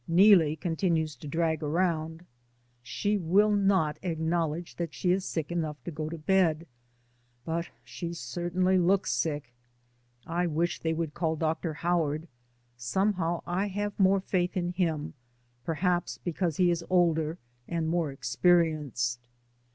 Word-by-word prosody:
Neelie 170 -3 +6
continues 160 -1 -1
to 145 - -9
drag 160 +1 0
around; 160 +1 -1 0.6
she 205 +12 -1
will 195 +5 +3
not 195 -7 +2
acknowledge 165 -1 -2
that 170 -2 -4
she 180 - +1
is 185 +1 +1
sick 160 -4 -3
enough 160 -3 -2
to 175 - -5
go 155 0 -4
to 165 - -5
bed, 165 -1 +2 0.8
but 170 +1 -2
she 125 +8 -6
certainly 175 +6 0
looks 190 +2 +2
sick. 140 0 -2 0.7
I 175 +1 0
wish 170 +2 -1
they 160 - -1
would 160 -2 -3
call 160 -2 -1
Dr. 160 0 -2
Howard; 165 -1 0 0.5
somehow, 175 - 0
I 190 +4 -1
have 205 +1 -3
more 195 0 +4
faith 180 -1 -1
in 175 -1 -1
him; 165 -5 -1 0.5
perhaps 175 +4 0
because 175 -2 -2
he 180 -1 +4
is 170 0 -1
older 165 -3 +2 0.3
and 165 -2 -1
more 165 -3 0
experienced. 135 -4 +1
170 Hz, 135 wpm, -29 LUFS, 155-180 Hz, 0.8 s, Neelie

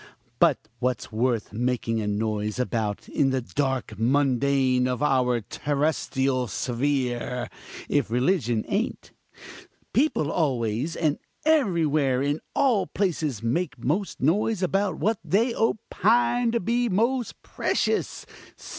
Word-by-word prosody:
But - - +3
what's 125 -1 -2
worth 115 -1 -1
making 115 -1 -1
a 105 - -3
noise 105 +1 -1
about 115 -5 -2
in 135 - +1
the 130 0 +1
dark 130 -3 -2
mundane 130 0 +2
of 125 +2 -2
our 125 -4 +2
terrestrial 135 0 -1
sphere, 125 +1 -1 0.4
if - - +1
religion 120 - +1
ain't? 210 +5 -2 0.8
People 250 - +2
always, 130 -1 0
and 155 -3 0 0.3
everywhere 160 - +2
in 145 +2 0 0.2
all 250 -8 +2
places, 155 - -1
make 135 +5 -1
most 165 - -2
noise 195 - +1
about 195 +1 0
what 215 0 0
they 230 +5 +2
opine 230 +2 +2
to 235 - +2
be 235 +4 0
most 235 +5 0
precious. - - -1
140 Hz, 115 wpm, -25 LUFS, 120-190 Hz, 0.8 s, But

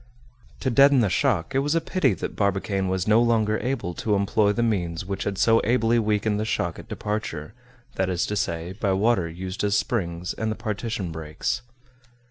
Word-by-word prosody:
To 130 - 0
deaden 140 +2 +6
the 105 -5 +1
shock, 95 +5 +1
it 135 - +3
was 145 +3 0
a - - +4
pity 165 - +1
that - - -5
Barbicane 100 -1 0
was 95 0 -1
no 110 +2 +5
longer 110 -2 +2
able 125 -9 -2
to 105 +4 0
employ 100 +1 +2
the 120 +3 0
means 90 -6 -1
which 100 +1 -4
had 100 -2 -2
so 115 +2 +4
ably 115 0 +2
weakened 105 -1 0
the - - 0
shock 110 - -2
at - - -12
departure, 105 -8 -4 0.4
that 95 0 +1
is 90 -1 0
to 105 - -3
say, 85 -3 -2
by 100 -1 0
water 95 -3 +2
used 95 +4 -5
as 100 -1 +2
springs 90 -6 -2
and 110 0 -2
the - - -2
partition 105 -4 -3
breaks. 80 +9 -3
105 Hz, 195 wpm, -25 LUFS, 95-115 Hz, 0.4 s, deaden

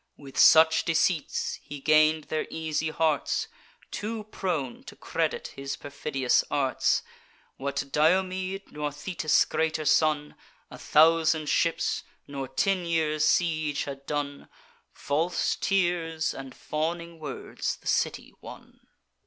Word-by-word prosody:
"With 140 -2 -12
such 160 0 +6
deceits 165 -1 0
he 145 - -9
gain'd 155 +2 +4
their 155 +1 -3
easy 160 -1 -2
hearts, 155 -3 0 0.4
Too 215 +1 -4
prone 170 - -3
to - - -10
credit - - -2
his 135 0 -5
perfidious 135 -2 0
arts. 135 -3 +1 0.5
What 140 0 -3
Diomede, 185 +4 +1
nor 150 -1 -3
Thetis' 155 +1 +1
greater 160 -1 -1
son, 150 0 +2 0.4
A - - -10
thousand 160 -1 +4
ships, 170 -1 +1 0.3
nor 140 -1 -5
ten 185 +8 0
years' 160 -3 +1
siege, 155 -4 +1
had 140 -1 -8
done: 145 -1 -4 0.4
False 165 +5 -1
tears 175 -4 0
and 135 -1 -9
fawning 170 +2 -4
words 145 -4 -4
the - - -26
city - - -1
won. - - -12
155 Hz, 120 wpm, -27 LUFS, 145-170 Hz, 0.5 s, such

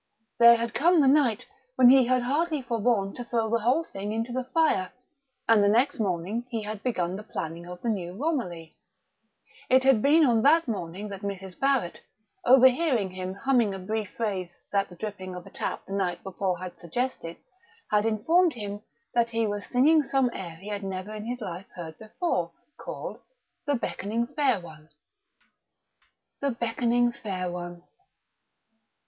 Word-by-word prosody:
There 235 0 +9
had 235 -1 -2
come 340 +7 +4
the 280 - +5
night 265 -6 +3 0.3
when 255 -1 +7
he 260 -2 +6
had 255 -1 +2
hardly 300 +3 0
forborne 230 -4 0
to 245 - -5
throw 230 -2 -1
the 230 - +2
whole 250 +9 +2
thing 205 -8 -6
into 225 +2 -2
the 255 +1 -2
fire; 255 - +1 0.6
and 225 -2 +5
the - - +4
next 245 +6 +2
morning 200 +4 -2
he 225 -3 -3
had 210 0 -5
begun 185 -8 -1
the 205 - -6
planning 170 -4 -6
of 180 0 -9
the 235 - 0
new 180 -4 -3
Romilly. 205 - -3 0.9
It 260 +1 +5
had 265 -5 +4
been 305 +4 +5
on 235 -4 +3
that 315 +4 +4
morning 200 -1 -4
that 195 -1 -7
Mrs. 195 -2 -6
Barrett, 270 -10 0 0.5
overhearing 255 - +5
him 185 0 -5
humming 235 -3 +1
a - - -5
brief 210 +2 -3
phrase 185 -6 -3
that 200 -1 +1
the 175 - -12
dripping 185 -2 -6
of 180 - -8
a - - -13
tap - - -4
the 195 - -7
night 190 -3 -1
before 190 -1 -2
had 180 0 -8
suggested, 170 -1 -3 0.5
had 210 +1 +3
informed 320 - +3
him 205 -2 -6 0.3
that 235 -1 +2
he 230 -1 0
was 205 -1 -3
singing 300 +6 +4
some 270 -3 +1
air 170 -3 -6
he 190 +6 -10
had 205 -1 -3
never 190 +2 -5
in 215 0 -6
his 245 0 -4
life 185 -1 -6
heard 165 -3 -7
before, 215 - -2 0.2
called - - -7 0.5
"The 290 - +2
Beckoning 230 -1 -2
Fair 270 -8 +2
One."... 155 -2 -13 1.5
The 280 - 0
Beckoning 240 0 +1
Fair 185 -6 -4
One!... 175 0 -7
220 Hz, 170 wpm, -27 LUFS, 185-250 Hz, 1.5 s, There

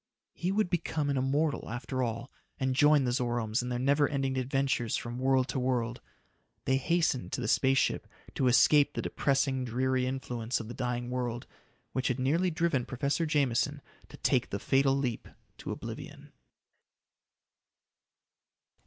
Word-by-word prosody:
He 180 +2 -2
would 205 -2 +1
become 155 -4 -1
an 140 - 0
immortal 140 +4 0
after 125 +2 -3
all 115 +1 -3 0.3
and 130 -1 0
join 145 +1 +5
the 125 - 0
Zoromes 120 -2 0
in 125 - -4
their 120 - -1
never 140 +3 +2
ending 135 -2 -1
adventures 130 -2 0
from 120 +1 -5
world 130 0 +2
to 135 - -1
world. 125 -1 -1 0.6
They 130 - +3
hastened 160 -3 0
to - - -2
the 115 - -2
space 135 +4 +3
ship - - +1 0.3
to 130 - +1
escape 140 +4 +5
the - - -2
depressing, 135 -1 0
dreary 130 +1 0
influence 125 -2 -3
of 110 - -7
the - - -5
dying 125 -1 -3
world, 120 -2 -3 0.5
which 130 0 0
had 125 - 0
nearly 155 +8 +1
driven 165 -6 0
Professor 140 +6 -1
Jameson 140 -6 +1 0.3
to - - -12
take - - +1
the - - -2
fatal 135 0 +2
leap 125 -5 -2 0.3
to - - -7
oblivion. - - -7
130 Hz, 155 wpm, -30 LUFS, 125-140 Hz, 0.6 s, join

